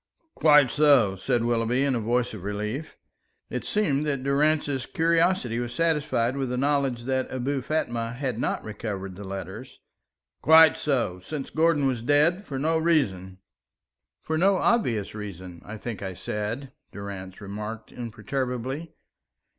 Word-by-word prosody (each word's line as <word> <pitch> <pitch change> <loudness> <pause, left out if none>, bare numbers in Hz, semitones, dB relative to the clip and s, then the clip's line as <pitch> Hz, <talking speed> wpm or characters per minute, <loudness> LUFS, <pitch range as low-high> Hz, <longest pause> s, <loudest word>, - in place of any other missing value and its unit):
"Quite 150 -5 +5
so," 140 -10 +4
said 120 +5 0
Willoughby, 120 +2 +1
in 140 -1 +2
a 120 - 0
voice 120 +2 0
of 105 - -7
relief. 105 +9 -4 0.5
It - - -3
seemed 150 -10 +1
that 140 -3 -1
Durrance's 140 -1 +1
curiosity 165 -7 +2
was 120 0 -4
satisfied 150 -7 +1
with 135 -2 -2
the 125 - -2
knowledge 135 -3 +1
that 130 +1 -1
Abou 130 +2 -1
Fatma 120 -5 -2
had 125 -3 -3
not - - -1
recovered 100 -3 -5
the 100 - -8
letters. 100 +5 -7 0.6
"Quite 160 -1 +7
so. 120 -11 -1
Since 135 +9 -6
Gordon 160 -3 +3
was 130 -4 0
dead, 150 - +2
for 135 - -4
no 160 +4 +1
reason." 100 - +1 0.9
"For 160 0 -1
no 195 +2 +4
obvious 150 - +1
reason, 95 -4 -8
I 105 +1 -8
think 115 -1 -6
I 95 -2 -5
said," 105 +8 -4 0.2
Durrance 95 -2 -7
remarked 105 +2 -7
imperturbably. 125 +5 -4
125 Hz, 145 wpm, -26 LUFS, 105-145 Hz, 0.9 s, Quite